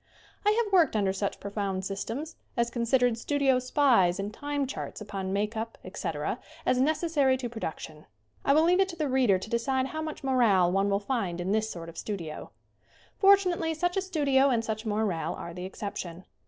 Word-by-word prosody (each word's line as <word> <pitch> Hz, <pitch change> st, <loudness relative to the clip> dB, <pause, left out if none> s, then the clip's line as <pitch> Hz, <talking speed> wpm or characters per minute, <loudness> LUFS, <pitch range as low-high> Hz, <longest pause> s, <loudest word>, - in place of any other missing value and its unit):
I 420 Hz, +2 st, +3 dB
have 410 Hz, -3 st, -7 dB
worked 335 Hz, -10 st, +5 dB
under 200 Hz, -3 st, +2 dB
such 195 Hz, +1 st, -2 dB
profound 200 Hz, -2 st, -3 dB
systems 225 Hz, +11 st, -4 dB, 0.2 s
as 235 Hz, 0 st, +1 dB
considered 240 Hz, 0 st, +2 dB
studio 275 Hz, -1 st, +2 dB
spies 250 Hz, -9 st, +3 dB
and 200 Hz, +2 st, -3 dB
time 290 Hz, +2 st, -2 dB
charts 270 Hz, -, -6 dB
upon 195 Hz, -3 st, -5 dB
make 210 Hz, +3 st, -1 dB
up, 225 Hz, +1 st, -4 dB
etc., 165 Hz, +1 st, -3 dB, 0.3 s
as 255 Hz, 0 st, +3 dB
necessary 295 Hz, -2 st, +2 dB
to 255 Hz, -1 st, -4 dB
production. 160 Hz, -8 st, -7 dB, 0.4 s
I 275 Hz, -, +4 dB
will 310 Hz, -, +5 dB
leave 355 Hz, +3 st, +4 dB
it 385 Hz, 0 st, +3 dB
to 345 Hz, -, -6 dB
the 305 Hz, -3 st, -1 dB
reader 255 Hz, -7 st, +3 dB
to 185 Hz, -, -7 dB
decide 260 Hz, +3 st, 0 dB
how 315 Hz, +2 st, -4 dB
much 310 Hz, -2 st, -6 dB
morale 225 Hz, -10 st, +3 dB
one 195 Hz, +2 st, +2 dB
will 200 Hz, 0 st, +2 dB
find 200 Hz, -6 st, -2 dB
in 180 Hz, +2 st, -2 dB
this 220 Hz, +1 st, +1 dB
sort 170 Hz, -4 st, -7 dB
of 165 Hz, -, -8 dB
studio. 170 Hz, -8 st, -5 dB, 0.7 s
Fortunately 365 Hz, -5 st, +4 dB
such 355 Hz, +3 st, 0 dB
a 385 Hz, -, +1 dB
studio 280 Hz, -7 st, +2 dB
and 230 Hz, -3 st, +1 dB
such 220 Hz, 0 st, -3 dB
a -, -, -1 dB
morale 205 Hz, -6 st, -1 dB
are 170 Hz, -, -7 dB
the 180 Hz, +1 st, -6 dB
exception. 185 Hz, -2 st, -6 dB
235 Hz, 195 wpm, -28 LUFS, 195-285 Hz, 0.7 s, worked